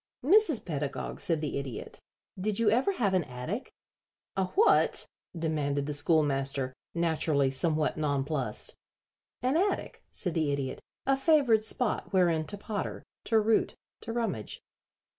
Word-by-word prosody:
"Mrs. 345 - +4
Pedagog," 145 -4 -4
said 165 -3 0
the 145 -2 -2
Idiot, 135 -5 -7 0.4
"did 205 +1 0
you 225 -2 +3
ever 255 - +2
have 205 - 0
an 185 -2 +3
attic?" 140 - -5 0.6
"A 190 - +1
what?" 425 +4 +4 0.3
demanded 145 -3 -1
the 150 - -2
Schoolmaster, 140 -3 +2 0.2
naturally 155 -5 +2
somewhat 155 +3 +1
nonplussed. 140 -5 0 0.7
"An 255 +3 +2
attic," 385 +5 0
said 180 -5 -2
the 155 -3 +1
Idiot. 140 -2 -3 0.2
"A 270 - +3
favored 270 -6 +4
spot 225 +1 0
wherein 170 -4 +3
to 205 - -5
potter, 205 0 -4 0.2
to 225 - +3
root, 220 +1 +2 0.3
to 230 - -5
rummage." 225 - -2
165 Hz, 135 wpm, -29 LUFS, 145-225 Hz, 0.7 s, Mrs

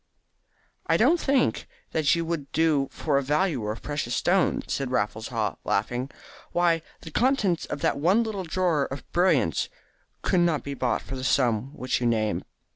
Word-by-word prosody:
"I - - +4
don't 345 - +4
think 275 -3 +1 0.2
that 160 0 +3
you 170 0 -1
would 160 -4 -4
do 155 -4 +2
for 145 -3 0
a - - -1
valuer 145 - 0
of 110 - -8
precious 145 -5 -2
stones," 185 0 +1
said 135 -2 -2
Raffles 110 -2 -1
Haw, 115 -4 -2
laughing. 120 +6 -1 0.4
"Why, 170 -2 +3 0.2
the 160 - -9
contents 215 - +1
of - - -5
that - - +1
one 190 +10 +3
little 210 -4 -3
drawer 170 -4 +1
of 135 - -6
brilliants 155 - +2 0.5
could 180 - +2
not 170 -3 +2
be 140 - -4
bought 125 -4 -1
for 135 - -6
the 130 - -5
sum 125 -2 +1
which 130 0 -1
you 120 - +2
name. 110 -6 0
145 Hz, 175 wpm, -26 LUFS, 125-175 Hz, 0.5 s, I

